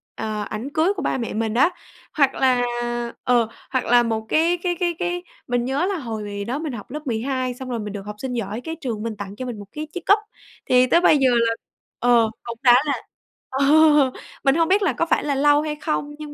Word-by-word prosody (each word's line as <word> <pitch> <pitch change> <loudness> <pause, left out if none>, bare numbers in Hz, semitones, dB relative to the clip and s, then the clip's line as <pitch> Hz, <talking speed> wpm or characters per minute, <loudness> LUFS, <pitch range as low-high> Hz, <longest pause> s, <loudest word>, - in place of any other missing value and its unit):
ờ, 215 -1 -3
ảnh 225 +6 -5
cưới 335 +6 +2
của 370 - -4
ba - - 0
mẹ 235 -3 -4
mình 220 0 -1
á. 255 +8 +4 0.4
Hoặc 280 -3 +3
là 255 -2 +3 0.6
ờ, 240 -3 +3 0.2
hoặc 260 -2 -1
là 240 0 +5
một 220 -1 -2
cái 335 +3 +3
cái 350 -1 0
cái 345 -2 0
cái 355 0 -2 0.2
mình 245 -1 0
nhớ 270 +7 0
là 385 -1 -1
hồi 210 -5 -5
đó 265 +5 -2
mình 310 -5 -4
học 220 +2 -8
lớp 300 -1 -6
12 255 +2 -1
xong 255 +1 -8
rồi 235 -2 -2
mình 210 -1 -5
được 205 - -5
học 210 - -6
sinh 260 +1 -4
giỏi 225 0 -3
cái 325 +3 -5
trường 225 -6 -3
mình 230 -1 -3
tặng 200 0 -7
cho 255 - -6
mình 240 -4 -6
một 205 - -10
cái 305 +1 -6
chiếc 360 -2 -6
cúp, 405 +2 +5 0.5
thì 250 0 +4
tới 340 - +4
bây 310 - +5
giờ 265 -2 +4 0.2
là 230 - +1 0.5
ờ, 235 -2 +4
cũng 235 -1 -6
đã 245 -2 +8
là 285 - +1 0.6
ờ, 270 +1 0 0.8
mình 270 +1 +4
hông 330 -1 +3
biết 390 +4 +3
là 340 -10 +2
có 330 - 0
phải - - +1
là 285 -2 0
lâu 290 +1 +4
hay 300 -1 -3
không, 295 -1 -3
nhưng 300 -1 -8
255 Hz, 240 wpm, -22 LUFS, 230-305 Hz, 0.8 s, đã